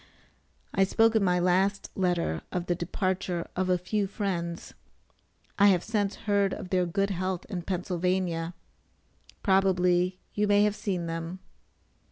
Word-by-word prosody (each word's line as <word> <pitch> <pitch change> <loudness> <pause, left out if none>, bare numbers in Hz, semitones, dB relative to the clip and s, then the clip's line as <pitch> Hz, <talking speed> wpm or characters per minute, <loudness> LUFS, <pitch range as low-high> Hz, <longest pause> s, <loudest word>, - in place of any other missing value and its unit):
I 195 - +4
spoke 225 +4 +3
in 220 - +4
my 180 -2 +3
last 185 +3 +1
letter 175 - 0
of 175 -1 -2
the 175 - +1
departure 180 0 -2
of 185 0 0
a 180 - +4
"few 195 +3 -1
friends." 175 -4 -3 0.9
I 200 - +7
have 185 -3 +4
since 205 -3 -1
heard 200 -2 +2
of 180 - -8
their 180 -1 +2
good 195 +4 0
health 185 -1 -2
in 185 -4 -3
Penn'a. 180 -1 -1 0.9
Probably 185 -2 +3
you 210 0 +1
may 205 0 +5
have 210 -1 +2
seen 185 -5 -2
them. 165 +2 -4
185 Hz, 145 wpm, -28 LUFS, 175-195 Hz, 0.9 s, I